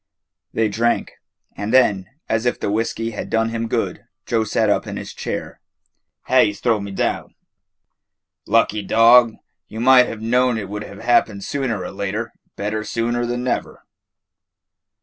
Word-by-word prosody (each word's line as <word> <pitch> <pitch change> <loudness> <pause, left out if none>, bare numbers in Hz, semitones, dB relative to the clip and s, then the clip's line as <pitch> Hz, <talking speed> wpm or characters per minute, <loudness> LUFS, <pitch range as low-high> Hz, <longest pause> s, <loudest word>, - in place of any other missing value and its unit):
They 110 -1 +1
drank, 115 +3 0 0.4
and 100 +2 -4
then, 105 -7 +3 0.2
as 115 +2 0
if 120 - 0
the 100 - -2
whiskey 115 +1 -1
had 105 - -6
done 115 0 +1
him 115 0 -3
good, - - -2 0.2
Joe 115 -2 +1
sat 110 +1 +1
up 105 - +1
in - - -5
his - - -7
chair. - - -5 0.6
"Ha'ie 105 - +3
's 100 - -13
throwed 115 -3 +1
me 100 - -6
down." 95 - -2 1.1
"Lucky 110 -1 +2
dog! 115 +3 +5 0.3
You 110 - -8
might 125 +1 +6
have 115 - -6
known 125 +2 +2
it 100 -3 -5
would 105 +1 -5
have 100 0 -11
happened 110 -4 +2
sooner 125 -9 -2
or - - -6
later. 100 +3 -4 0.2
Better 110 +1 -3
sooner 120 +2 -1
than 120 +1 -2
never." 125 - -3
115 Hz, 160 wpm, -20 LUFS, 105-120 Hz, 1.1 s, might